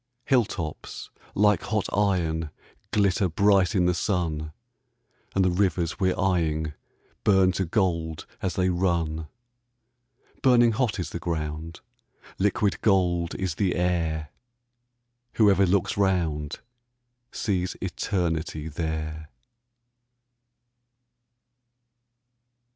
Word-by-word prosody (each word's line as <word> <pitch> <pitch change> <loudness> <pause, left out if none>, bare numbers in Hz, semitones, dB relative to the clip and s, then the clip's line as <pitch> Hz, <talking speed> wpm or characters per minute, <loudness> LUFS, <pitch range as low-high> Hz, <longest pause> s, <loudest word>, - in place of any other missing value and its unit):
Hill 125 -4 +4
tops 80 -6 -6 0.2
like 105 -1 +4
hot 105 -2 -1
iron 85 -6 +1 0.4
glitter 100 -2 +2
bright 95 +2 +3
in 90 -2 +3
the 90 - +3
sun, 80 -5 -1 0.8
And 95 -1 +3
the 90 - +3
rivers 90 -3 0
we're 95 -1 +2
eying 80 -5 0 0.5
burn 95 -2 +4
to 95 +1 -1
gold 85 -4 -1 0.2
as 95 - -2
they 95 0 +2
run; 85 -3 0 1.1
Burning 120 -3 +5
hot 115 -1 0
is 85 -3 -4
the 85 - -4
ground, 80 -1 -4 0.6
liquid 100 +1 +1
gold 90 -4 +2
is 95 -4 -2
the 90 +2 0
air; 85 -4 0 1.0
Whoever 100 -3 +4
looks 95 0 +1
round 85 -7 0 0.7
sees 90 -4 -2
Eternity 80 -3 -2
there. 80 -1 -4
90 Hz, 100 wpm, -26 LUFS, 80-95 Hz, 1.1 s, Burning